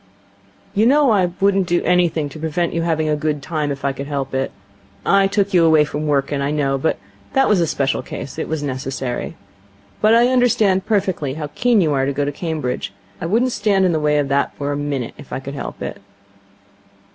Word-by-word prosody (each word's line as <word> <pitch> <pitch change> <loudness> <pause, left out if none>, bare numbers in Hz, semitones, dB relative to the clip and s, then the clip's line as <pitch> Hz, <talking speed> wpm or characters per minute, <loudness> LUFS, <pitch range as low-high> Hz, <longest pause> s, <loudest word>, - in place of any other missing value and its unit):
'You 215 +2 +3
know 280 -1 +4
I 190 -4 +3
wouldn't 195 -1 +2
do 175 0 +1
anything 175 -4 +2
to 150 - -10
prevent 160 +2 -1
you 165 - 0
having 160 -2 0
a 150 - +2
good 150 -1 -2
time, 150 -2 -2
if 140 0 -5
I 140 - +1
could 140 +1 -6
help 140 -2 -3
it. 135 0 -1 0.5
I 195 0 +4
took 200 0 0
you 175 -2 +5
away 160 -2 +5
from 150 +1 -4
Wrykyn, 140 0 0
I 140 - 0
know, 140 -2 0
but 160 - 0 0.4
that 270 -1 +4
was 205 -4 +3
a 165 - +2
special 135 -2 0
case. 140 - -7
It - - -3
was 155 -2 -3
necessary. 130 -2 -4 0.7
But 215 +1 +5
I 240 +1 +5
understand 220 -6 +2
perfectly 190 -10 0
how 150 -2 -5
keen 240 -4 +3
you 155 -4 +2
are 135 -1 +1
to 140 - -1
go 145 +1 -1
to 145 - -1
Cambridge, 150 -5 -3 0.3
and 165 - -3
I - - -5
wouldn't 245 +4 +2
stand 200 -4 +2
in 180 - +3
the 160 - +1
way 150 0 +2 0.4
for 145 0 -2
a - - -1
minute, 145 -4 -3
if 145 - -13
I - - -3
could 140 +1 -7
help 140 - -6
it.' - - -6
155 Hz, 215 wpm, -20 LUFS, 140-195 Hz, 0.7 s, you